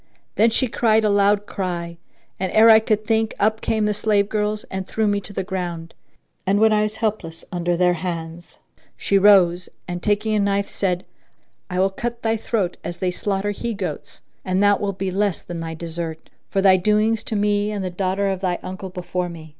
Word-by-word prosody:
Then 225 Hz, +2 st, +4 dB
she 255 Hz, +3 st, 0 dB
cried 220 Hz, -1 st, +2 dB
a 210 Hz, -, +3 dB
loud 205 Hz, 0 st, +3 dB
cry 170 Hz, -4 st, -4 dB, 0.4 s
and, 190 Hz, -1 st, -2 dB
ere 225 Hz, +1 st, +7 dB
I 220 Hz, -, +8 dB
could 215 Hz, -1 st, -1 dB
think, 220 Hz, 0 st, +1 dB
up 220 Hz, +2 st, +1 dB
came 220 Hz, -1 st, 0 dB
the 210 Hz, -, +1 dB
slave 205 Hz, -1 st, +1 dB
girls 210 Hz, 0 st, -1 dB
and 190 Hz, 0 st, -4 dB
threw 220 Hz, -, -1 dB
me 205 Hz, 0 st, +1 dB
on 200 Hz, -, -11 dB
the 190 Hz, -, -1 dB
ground; 175 Hz, -3 st, -5 dB, 0.5 s
and 200 Hz, +2 st, +2 dB
when 220 Hz, 0 st, +5 dB
I 210 Hz, -, +3 dB
was 215 Hz, 0 st, -1 dB
helpless 205 Hz, -8 st, -3 dB
under 175 Hz, -1 st, -1 dB
their 180 Hz, 0 st, +3 dB
hands 170 Hz, -1 st, -6 dB, 0.4 s
she 200 Hz, -, +2 dB
rose 185 Hz, -3 st, +5 dB, 0.2 s
and, 175 Hz, -1 st, -4 dB
taking 210 Hz, +2 st, 0 dB
a 210 Hz, -, +2 dB
knife, 200 Hz, 0 st, 0 dB
said, 180 Hz, -2 st, -1 dB, 0.6 s
"I 180 Hz, -1 st, -2 dB
will 190 Hz, +1 st, +3 dB
cut 235 Hz, +4 st, -5 dB
thy 225 Hz, 0 st, +2 dB
throat 210 Hz, -5 st, -2 dB
as 175 Hz, -, -5 dB
they 185 Hz, -1 st, -1 dB
slaughter 200 Hz, +2 st, -2 dB
he 230 Hz, +2 st, -4 dB
goats; 195 Hz, -2 st, -6 dB, 0.2 s
and 185 Hz, +1 st, +1 dB
that 205 Hz, 0 st, +4 dB
will 200 Hz, -1 st, -1 dB
be 190 Hz, 0 st, -3 dB
less 200 Hz, -1 st, 0 dB
than 175 Hz, -1 st, -6 dB
thy 165 Hz, 0 st, -5 dB
desert, 165 Hz, -1 st, -6 dB, 0.2 s
for 195 Hz, -, 0 dB
thy 190 Hz, -1 st, +6 dB
doings 215 Hz, +3 st, +1 dB
to 220 Hz, -, -3 dB
me 205 Hz, 0 st, +1 dB
and 205 Hz, -3 st, -3 dB
the 185 Hz, -, -3 dB
daughter 190 Hz, +2 st, -1 dB
of 190 Hz, -1 st, -3 dB
thy 180 Hz, -2 st, 0 dB
uncle 185 Hz, +1 st, -6 dB
before 180 Hz, 0 st, -3 dB
me." 160 Hz, -2 st, -10 dB
195 Hz, 210 wpm, -22 LUFS, 180-210 Hz, 0.6 s, I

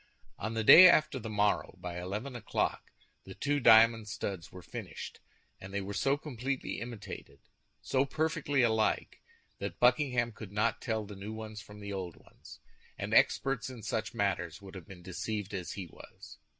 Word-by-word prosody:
On 110 Hz, +2 st, -3 dB
the 110 Hz, -, 0 dB
day 180 Hz, +11 st, +11 dB
after 155 Hz, -5 st, +3 dB
the 110 Hz, -1 st, -6 dB
morrow, 105 Hz, -1 st, +1 dB
by 90 Hz, 0 st, -5 dB
eleven 105 Hz, +9 st, -5 dB
o'clock, 115 Hz, -3 st, -2 dB, 0.3 s
the -, -, -10 dB
two 145 Hz, 0 st, 0 dB
diamond 115 Hz, -2 st, +6 dB
studs 100 Hz, -3 st, -5 dB
were 90 Hz, -1 st, -11 dB
finished, -, -, -8 dB, 0.4 s
and 95 Hz, -, -10 dB
they 100 Hz, -, -1 dB
were 100 Hz, +1 st, -5 dB
so 135 Hz, +7 st, +1 dB
completely 135 Hz, -2 st, -4 dB
imitated, 115 Hz, -3 st, -8 dB, 0.4 s
so 135 Hz, +1 st, +1 dB
perfectly 150 Hz, -2 st, 0 dB
alike, 110 Hz, -2 st, +1 dB, 0.4 s
that -, -, -5 dB
Buckingham 125 Hz, -1 st, +3 dB
could 105 Hz, -2 st, -10 dB
not 105 Hz, +3 st, 0 dB
tell 110 Hz, -3 st, -2 dB
the 100 Hz, 0 st, -9 dB
new 100 Hz, +3 st, -7 dB
ones 110 Hz, -1 st, -7 dB
from 105 Hz, +1 st, -13 dB
the 100 Hz, 0 st, -5 dB
old 90 Hz, -3 st, -5 dB
ones, -, -, -16 dB, 0.4 s
and -, -, -4 dB
experts 135 Hz, -2 st, +3 dB
in 120 Hz, -4 st, -10 dB
such -, -, -3 dB
matters -, -, -1 dB
would 100 Hz, -1 st, -12 dB
have 95 Hz, -2 st, -10 dB
been 90 Hz, -3 st, -12 dB
deceived 105 Hz, +2 st, -4 dB
as 90 Hz, -3 st, -4 dB
he 95 Hz, -, -6 dB
was. 85 Hz, -, -14 dB
110 Hz, 175 wpm, -31 LUFS, 100-125 Hz, 0.4 s, day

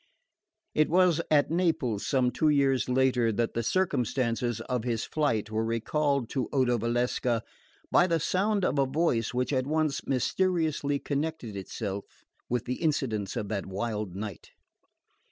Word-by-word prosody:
It 155 Hz, -, +3 dB
was 175 Hz, -1 st, +4 dB
at 150 Hz, 0 st, +3 dB
Naples, 160 Hz, -, 0 dB
some 130 Hz, -3 st, +2 dB
two 155 Hz, +5 st, +2 dB
years 135 Hz, -3 st, +2 dB
later, 125 Hz, -2 st, +3 dB
that 115 Hz, +2 st, -1 dB
the 115 Hz, -, 0 dB
circumstances 120 Hz, -, 0 dB
of 125 Hz, -1 st, -2 dB
his 115 Hz, -2 st, -1 dB
flight 115 Hz, -9 st, 0 dB
were 110 Hz, +1 st, 0 dB
recalled 135 Hz, +4 st, 0 dB
to 130 Hz, -, -1 dB
Odo 125 Hz, -3 st, +2 dB
Valsecca 120 Hz, 0 st, 0 dB, 0.5 s
by 175 Hz, -, +5 dB
the 165 Hz, -2 st, +1 dB
sound 195 Hz, +4 st, +1 dB
of 145 Hz, -, +1 dB
a 135 Hz, -, +3 dB
voice 130 Hz, -6 st, +1 dB
which 125 Hz, +3 st, -1 dB
at 130 Hz, 0 st, 0 dB
once 155 Hz, -1 st, 0 dB
mysteriously 155 Hz, +1 st, +1 dB
connected 140 Hz, -6 st, -3 dB
itself 100 Hz, 0 st, -4 dB, 0.4 s
with 120 Hz, -2 st, -1 dB
the 125 Hz, +1 st, -4 dB
incidents 125 Hz, -, -1 dB
of 105 Hz, -, -3 dB
that 100 Hz, -3 st, -3 dB
wild 105 Hz, -1 st, -3 dB
night. 100 Hz, -2 st, -6 dB
125 Hz, 150 wpm, -28 LUFS, 115-150 Hz, 0.5 s, by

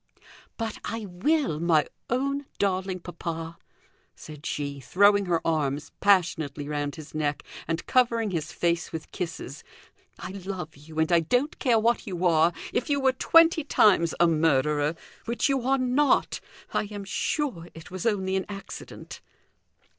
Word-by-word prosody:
"But 225 Hz, -2 st, -4 dB
I 225 Hz, -1 st, -4 dB
will, 200 Hz, -, 0 dB
my 160 Hz, -3 st, +3 dB, 0.2 s
own 275 Hz, +3 st, -1 dB
darling 190 Hz, -2 st, -1 dB
papa," 165 Hz, -1 st, -6 dB, 0.6 s
said 150 Hz, -1 st, -9 dB
she, 140 Hz, -1 st, -3 dB
throwing 200 Hz, +6 st, +4 dB
her 170 Hz, -2 st, 0 dB
arms 150 Hz, -3 st, -1 dB
passionately 160 Hz, -7 st, +2 dB
round 145 Hz, -1 st, -2 dB
his 155 Hz, -2 st, -11 dB
neck, 150 Hz, -1 st, -1 dB, 0.2 s
and 165 Hz, 0 st, -2 dB
covering 230 Hz, -4 st, +2 dB
his 160 Hz, -2 st, -3 dB
face 170 Hz, -1 st, -1 dB
with 160 Hz, -1 st, -7 dB
kisses. 160 Hz, -5 st, -6 dB, 0.5 s
"I -, -, -7 dB
love 190 Hz, -4 st, -6 dB
you, 155 Hz, +3 st, -13 dB
and 160 Hz, +2 st, +2 dB
I 170 Hz, -, +6 dB
don't 245 Hz, -, 0 dB
care 245 Hz, -5 st, +3 dB
what 230 Hz, +1 st, +1 dB
you 180 Hz, -2 st, -2 dB
are, 165 Hz, 0 st, +4 dB, 0.2 s
if 245 Hz, -, -1 dB
you 285 Hz, -1 st, +2 dB
were 265 Hz, -1 st, +4 dB
twenty 330 Hz, +4 st, +5 dB
times 190 Hz, -, +4 dB
a 175 Hz, -, +6 dB
murderer, 150 Hz, -1 st, +2 dB, 0.3 s
which 235 Hz, +4 st, 0 dB
you 270 Hz, -1 st, +1 dB
are 270 Hz, 0 st, +3 dB
not; 260 Hz, +3 st, +2 dB, 0.3 s
I -, -, +1 dB
am 205 Hz, -1 st, -6 dB
sure 200 Hz, -, -2 dB
it 165 Hz, +2 st, -11 dB
was 185 Hz, +5 st, -3 dB
only 190 Hz, -3 st, 0 dB
an 190 Hz, -, -1 dB
accident." 195 Hz, -1 st, -9 dB
180 Hz, 155 wpm, -26 LUFS, 160-230 Hz, 0.6 s, I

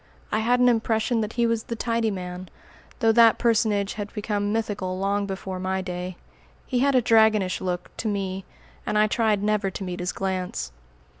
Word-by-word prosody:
I 215 Hz, -, +1 dB
had 245 Hz, +3 st, +2 dB
an 250 Hz, -, +5 dB
impression 225 Hz, 0 st, +1 dB
that 215 Hz, +1 st, -3 dB
he 235 Hz, -1 st, +1 dB
was 230 Hz, -1 st, +1 dB
the 230 Hz, -, -4 dB
"tidy 230 Hz, 0 st, 0 dB
man," 180 Hz, -2 st, -6 dB, 0.5 s
though 225 Hz, -1 st, +5 dB
that 230 Hz, -1 st, +6 dB
personage 215 Hz, -4 st, +1 dB
had 205 Hz, -1 st, -6 dB
become 205 Hz, -1 st, -1 dB
mythical 205 Hz, -4 st, -2 dB
long 200 Hz, +1 st, 0 dB
before 190 Hz, -1 st, -5 dB
my 190 Hz, +1 st, -1 dB
day. 180 Hz, 0 st, -5 dB, 0.5 s
He 250 Hz, -, -1 dB
had 275 Hz, +1 st, +3 dB
a 250 Hz, -, +4 dB
dragonish 220 Hz, -5 st, +3 dB
look, 180 Hz, -1 st, -4 dB
to 225 Hz, -, -3 dB
me; 195 Hz, -2 st, -2 dB, 0.4 s
and 210 Hz, -, -1 dB
I 210 Hz, -, +5 dB
tried 215 Hz, -2 st, +1 dB
never 210 Hz, -2 st, +1 dB
to 190 Hz, -, -6 dB
meet 180 Hz, -1 st, -5 dB
his 180 Hz, 0 st, -1 dB
glance. 185 Hz, -, -3 dB
205 Hz, 190 wpm, -25 LUFS, 190-225 Hz, 0.5 s, that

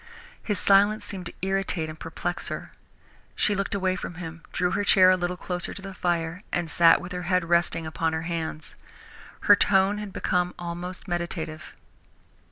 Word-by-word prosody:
His 205 Hz, -3 st, -1 dB
silence 205 Hz, +3 st, +4 dB
seemed 185 Hz, -3 st, -5 dB
to -, -, -7 dB
irritate 195 Hz, -4 st, 0 dB
and 155 Hz, 0 st, -9 dB
perplex -, -, -3 dB
her. -, -, -6 dB, 0.6 s
She 210 Hz, -, +2 dB
looked 200 Hz, 0 st, -2 dB
away 185 Hz, -1 st, +1 dB
from 175 Hz, -, -6 dB
him, 165 Hz, -1 st, -7 dB
drew 180 Hz, 0 st, 0 dB
her 205 Hz, -, 0 dB
chair 185 Hz, -2 st, +6 dB
a -, -, +5 dB
little 180 Hz, 0 st, -2 dB
closer 180 Hz, -1 st, -4 dB
to 200 Hz, -, -8 dB
the 195 Hz, -1 st, -7 dB
fire, 170 Hz, 0 st, -1 dB
and 170 Hz, -2 st, -1 dB
sat 165 Hz, -1 st, +6 dB
with 175 Hz, -, -8 dB
her 180 Hz, 0 st, -4 dB
head 180 Hz, -2 st, +2 dB
resting 170 Hz, -1 st, +2 dB
upon 160 Hz, +1 st, -1 dB
her 160 Hz, 0 st, -2 dB
hands. 165 Hz, -2 st, -4 dB, 0.7 s
Her 205 Hz, -, +7 dB
tone 200 Hz, +1 st, +3 dB
had 210 Hz, -2 st, -6 dB
become 180 Hz, -1 st, 0 dB
almost 175 Hz, +2 st, -6 dB
meditative. 170 Hz, -3 st, -4 dB
180 Hz, 175 wpm, -26 LUFS, 170-195 Hz, 0.7 s, Her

